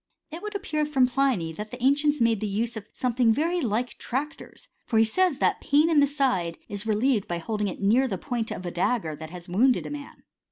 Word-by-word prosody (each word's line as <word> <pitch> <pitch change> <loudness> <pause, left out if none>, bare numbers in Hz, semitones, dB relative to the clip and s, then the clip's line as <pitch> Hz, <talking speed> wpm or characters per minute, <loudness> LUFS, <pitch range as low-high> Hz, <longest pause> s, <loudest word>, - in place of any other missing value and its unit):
It 330 +3 -7
would 420 0 -6
appear 315 -6 -1
from 285 -4 +3
Pliny, 250 -10 0
that 210 +6 -7
the 250 - -8
ancients 290 +2 +3
made 230 -3 +2
use 220 +3 -2
of 220 -1 -8
something 245 -2 +1
very 335 +8 +1
like 240 0 -2
tractors; 295 - -5 0.2
for 225 - -1
he 225 - +6
says 355 +6 +1
that - - +1
pain 300 +4 +3
in 310 - +5
the 285 - +5
side 255 - 0
is 205 +2 -5
relieved 220 0 +1
by 175 - -2
holding 210 +4 -2
near 225 +7 +3
it - - 0
the 195 -6 -3
point 230 +2 -3
oi - - -2
a 180 -1 -5
dagger 175 -3 0
that 155 +1 -9
has 175 0 -10
wounded 240 +9 +2
a - - -6
man. 290 -1 -9
245 Hz, 225 wpm, -26 LUFS, 205-285 Hz, 0.2 s, he